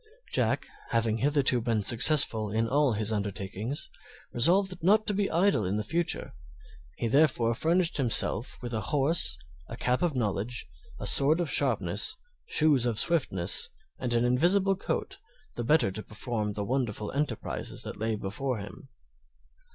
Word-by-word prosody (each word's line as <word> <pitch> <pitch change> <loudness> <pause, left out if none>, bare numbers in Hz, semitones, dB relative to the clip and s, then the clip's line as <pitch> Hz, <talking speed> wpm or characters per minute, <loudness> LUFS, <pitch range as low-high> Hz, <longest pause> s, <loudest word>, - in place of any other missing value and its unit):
Jack, - - 0 0.2
having 115 -1 0
hitherto 135 -2 +2
been 115 -2 -1
successful 115 -2 +4
in 110 +2 -1
all 140 0 +2
his 110 0 0
undertakings, 100 +5 -4 0.5
resolved 185 +9 +2
not 215 +4 +3
to 210 - 0
be 200 0 -1
idle 170 - +2
in 100 +3 -2
future; 170 +10 -1 0.6
he 120 - -2
therefore 120 -3 +2
furnished 170 +7 +1
himself 125 -2 +3
with 120 -1 -5
a 110 - -2
horse, 140 - 0 0.3
a 115 - -7
cap 125 0 0
of 170 -5 0
knowledge, 110 -2 -3 0.3
a - - -6
sword 150 +5 +4
of 170 -5 -2
sharpness, 105 - +1 0.3
shoes 150 - +3
of 115 -3 -2
swiftness, 100 - +1 0.3
and 120 -2 -1
an 120 +1 +2
invisible 180 +10 +2
coat, 385 - -4 0.4
the 120 - -4
better 150 -5 +2
to 110 - -6
perform 105 -1 -4
the 100 0 -4
wonderful 115 -4 -2
enterprises 140 -5 -1
that - - -7
lay 110 0 -1
before 110 +6 -3
him. 100 -3 -10
120 Hz, 150 wpm, -28 LUFS, 110-155 Hz, 0.6 s, successful